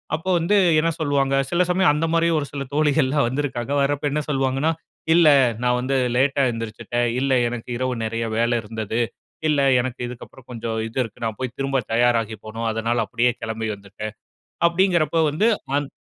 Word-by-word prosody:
அப்போ 165 Hz, +4 st, -5 dB
வந்து 175 Hz, +6 st, +1 dB, 0.2 s
என்ன 165 Hz, +2 st, +2 dB
சொல்லுவாங்க? 140 Hz, -2 st, +1 dB, 0.2 s
சில 175 Hz, +1 st, +3 dB
சமயம் 180 Hz, -2 st, +4 dB
அந்த 160 Hz, +2 st, 0 dB
மாதிரி 165 Hz, 0 st, +3 dB
ஒரு 145 Hz, -, -3 dB
சில 140 Hz, -1 st, -4 dB
தோழிகள்லாம் 145 Hz, -3 st, +2 dB
வந்திருக்காங்க. 135 Hz, -2 st, -3 dB
வரப்போ 145 Hz, +1 st, 0 dB
என்ன 150 Hz, 0 st, -1 dB
சொல்லுவாங்கன்னா, 135 Hz, +3 st, +1 dB, 0.4 s
"இல்ல 170 Hz, -2 st, +6 dB, 0.4 s
நான் 125 Hz, 0 st, +2 dB
வந்து 135 Hz, +1 st, 0 dB, 0.2 s
லேட்டா 135 Hz, +1 st, +2 dB
எந்திரிச்சிட்டேன். 115 Hz, +1 st, -3 dB
இல்ல 135 Hz, 0 st, 0 dB, 0.2 s
எனக்கு 120 Hz, 0 st, -7 dB
இரவு 130 Hz, 0 st, -1 dB
நிறைய 115 Hz, +1 st, -2 dB
வேலை 120 Hz, +1 st, +2 dB
இருந்தது. 110 Hz, +1 st, -4 dB, 0.5 s
இல்ல 145 Hz, -2 st, +2 dB, 0.2 s
எனக்கு 125 Hz, 0 st, -5 dB
இதுக்கப்புறம் 125 Hz, +1 st, -11 dB
கொஞ்சம் 115 Hz, -1 st, -3 dB
இது 115 Hz, -, -10 dB
இருக்கு, 115 Hz, +1 st, -10 dB
நான் 110 Hz, -2 st, -3 dB
போய் 125 Hz, -1 st, -4 dB
திரும்ப 135 Hz, 0 st, 0 dB, 0.2 s
தயாராகி 115 Hz, -2 st, +2 dB
போணும். 115 Hz, +1 st, -3 dB
அதனால 115 Hz, +1 st, 0 dB
அப்படியே 120 Hz, +3 st, +1 dB
கிளம்பி 110 Hz, 0 st, -3 dB
வந்துட்டேன்." 100 Hz, +2 st, -8 dB, 0.5 s
அப்படிங்கிறப்ப 170 Hz, -2 st, +2 dB
வந்து 185 Hz, +10 st, +1 dB, 0.3 s
அந் 145 Hz, -1 st, -2 dB
130 Hz, 165 wpm, -22 LUFS, 115-145 Hz, 0.5 s, இல்ல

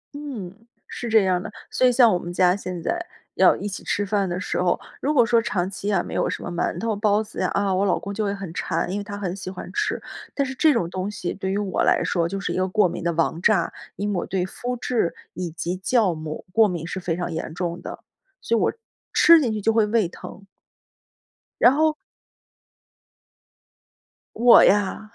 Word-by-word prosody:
嗯， 255 Hz, -12 st, -6 dB, 0.3 s
是 240 Hz, -, -6 dB
这 220 Hz, -2 st, +5 dB
样 180 Hz, -1 st, +1 dB
的。 -, -, -7 dB, 0.2 s
所 255 Hz, -, +3 dB
以 -, -, +4 dB
像 240 Hz, -2 st, +6 dB
我 175 Hz, -, +1 dB
们 175 Hz, -, -6 dB
家 180 Hz, 0 st, +3 dB
现 185 Hz, -3 st, -6 dB
在 345 Hz, 0 st, -1 dB, 0.3 s
要 -, -, +5 dB
一 205 Hz, -, -5 dB
起 200 Hz, -, -6 dB
吃 205 Hz, -, -1 dB
饭 200 Hz, -2 st, 0 dB
的 175 Hz, -, -2 dB
时 185 Hz, -, -2 dB
候， 175 Hz, -1 st, +1 dB, 0.2 s
如 290 Hz, -, +1 dB
果 250 Hz, -6 st, +4 dB
说 230 Hz, 0 st, +3 dB
长 185 Hz, -5 st, -1 dB
期 200 Hz, +1 st, -6 dB
呀 205 Hz, -, +1 dB
没 -, -, -8 dB
有 -, -, 0 dB
什 -, -, -5 dB
么 -, -, -5 dB
馒 175 Hz, -, -2 dB
头 225 Hz, -2 st, -1 dB
包 210 Hz, +1 st, +2 dB
子 210 Hz, -, -9 dB
呀， -, -, +1 dB
啊， 200 Hz, -1 st, +1 dB
我 190 Hz, +2 st, +1 dB
老 190 Hz, -, +2 dB
公 200 Hz, -, -6 dB
就 215 Hz, +1 st, -2 dB
会 200 Hz, -1 st, -1 dB
很 195 Hz, -4 st, -7 dB
馋， 175 Hz, -, -2 dB
因 205 Hz, -, -2 dB
为 -, -, -4 dB
他 205 Hz, 0 st, -7 dB
很 190 Hz, -2 st, -3 dB
喜 185 Hz, -1 st, -7 dB
欢 185 Hz, -, -8 dB
吃。 425 Hz, 0 st, -1 dB, 0.4 s
但 280 Hz, -, +1 dB
是 265 Hz, -, -5 dB
这 305 Hz, +4 st, +4 dB
种 230 Hz, -10 st, 0 dB
东 190 Hz, +2 st, -3 dB
西 190 Hz, -4 st, -4 dB
对 190 Hz, -1 st, -4 dB
于 195 Hz, -, 0 dB
我 200 Hz, -3 st, -1 dB
来 -, -, +3 dB
说 170 Hz, -1 st, 0 dB
就 195 Hz, -, -3 dB
是 195 Hz, -, -3 dB
一 -, -, -3 dB
个 185 Hz, 0 st, +1 dB
过 200 Hz, 0 st, +3 dB
敏 170 Hz, -, -6 dB
的 170 Hz, -, +1 dB
王 165 Hz, +1 st, 0 dB
炸， 195 Hz, -4 st, +2 dB, 0.2 s
因 205 Hz, +2 st, -2 dB
为 180 Hz, -, 0 dB
我 -, -, -3 dB
对 185 Hz, -1 st, -1 dB
麸 245 Hz, +6 st, -5 dB
质 230 Hz, -10 st, 0 dB, 0.2 s
以 180 Hz, -2 st, -4 dB
及 170 Hz, +2 st, -4 dB
酵 210 Hz, -2 st, +2 dB
母 155 Hz, -1 st, -7 dB
过 220 Hz, 0 st, +5 dB
敏 170 Hz, -3 st, -4 dB
是 190 Hz, +2 st, -4 dB
非 175 Hz, -2 st, -2 dB
常 175 Hz, -, -3 dB
严 160 Hz, -, -4 dB
重 175 Hz, -1 st, -3 dB
的， -, -, -8 dB, 0.4 s
所 230 Hz, -, 0 dB
以 -, -, +1 dB
我 -, -, +2 dB, 0.4 s
吃 335 Hz, -2 st, +7 dB
进 240 Hz, -, 0 dB
去 215 Hz, -1 st, -3 dB
就 225 Hz, +2 st, +2 dB
会 220 Hz, -2 st, +3 dB
胃 215 Hz, -4 st, +2 dB
疼。 190 Hz, +2 st, -11 dB, 1.2 s
然 245 Hz, -, +8 dB
后 310 Hz, +1 st, +2 dB, 2.4 s
我 240 Hz, +1 st, +7 dB
呀！ 205 Hz, +2 st, +2 dB
200 Hz, 245 characters per minute, -23 LUFS, 180-225 Hz, 2.4 s, 然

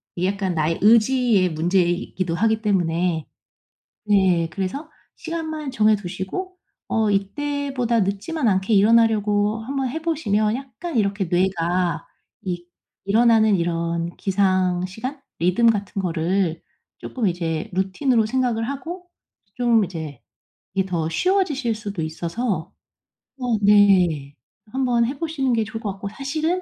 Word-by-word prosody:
이게 180 Hz, +1 st, 0 dB
약간 195 Hz, -2 st, -2 dB
나의 160 Hz, +1 st, 0 dB
의지의 225 Hz, -2 st, +4 dB
문제이기도 175 Hz, +1 st, 0 dB
하기 220 Hz, +3 st, +1 dB
때문에. 175 Hz, -5 st, 0 dB, 0.8 s
네. 190 Hz, -5 st, +3 dB
그래서 215 Hz, -, -4 dB, 0.3 s
시간만 315 Hz, -3 st, -4 dB
정해두시고 215 Hz, -, -1 dB, 0.3 s
어 220 Hz, -2 st, +1 dB
이때보다 250 Hz, +3 st, -1 dB
늦지만 210 Hz, +9 st, -1 dB
않게 190 Hz, +2 st, +1 dB
일어나려고 210 Hz, 0 st, +3 dB
한번 270 Hz, +1 st, -2 dB
해 320 Hz, +6 st, -4 dB
보시면 220 Hz, -9 st, +1 dB
약간 275 Hz, +4 st, -7 dB
이렇게 200 Hz, -2 st, +1 dB
뇌가 175 Hz, 0 st, 0 dB, 0.4 s
이 175 Hz, -2 st, -4 dB, 0.4 s
일어나는 220 Hz, 0 st, +4 dB
이런 170 Hz, 0 st, -2 dB
기상 185 Hz, -2 st, +1 dB
시간? 250 Hz, +9 st, -6 dB, 0.2 s
리듬 185 Hz, +7 st, +4 dB
같은 200 Hz, -1 st, -2 dB
거를 175 Hz, 0 st, -1 dB, 0.4 s
쪼끔 245 Hz, -5 st, -3 dB
이제 165 Hz, -3 st, -3 dB
루틴으로 215 Hz, +6 st, +1 dB
생각을 240 Hz, -1 st, 0 dB
하고 345 Hz, +6 st, -6 dB, 0.5 s
좀 235 Hz, -3 st, +3 dB
이제 160 Hz, -7 st, -7 dB, 0.5 s
이게 190 Hz, -1 st, +1 dB
더 165 Hz, -3 st, -1 dB
쉬워지실 290 Hz, -, +1 dB
수도 205 Hz, -4 st, -5 dB
있어서 170 Hz, +3 st, -3 dB, 0.7 s
어 245 Hz, -3 st, 0 dB
네 185 Hz, -9 st, +4 dB, 0.4 s
한번 245 Hz, -2 st, +1 dB
해 270 Hz, +4 st, -3 dB
보시는 300 Hz, -6 st, -1 dB
게 225 Hz, -1 st, +2 dB
좋을 225 Hz, +2 st, -7 dB
것 205 Hz, -4 st, -2 dB
같고. 200 Hz, +1 st, -6 dB
사실은 310 Hz, -, -2 dB
205 Hz, 275 characters per minute, -22 LUFS, 180-245 Hz, 0.8 s, 의지의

